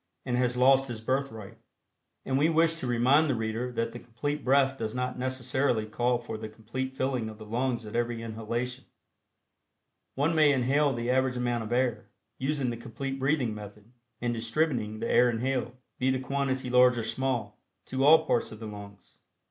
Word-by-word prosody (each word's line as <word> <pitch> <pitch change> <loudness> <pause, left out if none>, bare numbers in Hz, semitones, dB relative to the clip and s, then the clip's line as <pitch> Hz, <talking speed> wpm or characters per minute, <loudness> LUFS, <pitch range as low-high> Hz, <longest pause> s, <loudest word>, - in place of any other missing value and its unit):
and 125 - 0
has 125 0 +1
lost 135 +1 +5
his 120 -3 -5
birthright. 110 -4 -3 0.7
And 130 - -1
we 145 +4 +4
wish 165 0 +3
to 130 - -4
remind 130 +6 +4
the 135 - +2
reader 115 +2 -2
that 115 -1 -1
the 120 - -8
Complete 145 +6 -4
Breath 135 +1 +3
does 110 -2 -4
not 125 0 -2
necessarily 130 -2 0
call 120 +3 0
for 120 -2 -7
the 110 0 -6
complete 120 +5 -5
filling 130 -4 -1
of 110 - -10
the 110 - -10
lungs 120 +1 -1
at 105 - -8
every 120 -1 -1
inhalation. 115 +3 -4 1.3
One 145 +5 +1
may 155 -2 +5
inhale 140 +3 +2
the 120 -1 -1
average 130 -1 +1
amount 120 -2 -1
of 110 - -8
air, 125 -1 0 0.3
using 135 -2 0
the 120 - -5
Complete 135 +4 -5
Breathing 135 -4 +1
Method 105 +1 -11 0.3
and 120 0 -1
distributing 115 -2 -1
the - - -2
air 125 - +5
inhaled, 125 +1 -1 0.3
be 130 - +2
the 130 - +2
quantity 130 -1 -2
large 125 0 +6
or 115 - -1
small, 130 -2 -2 0.3
to 130 +1 -1
all 160 +2 +7
parts 120 - 0
of 110 - -10
the 115 - -7
lungs. 100 -2 -11
125 Hz, 185 wpm, -28 LUFS, 115-135 Hz, 1.3 s, all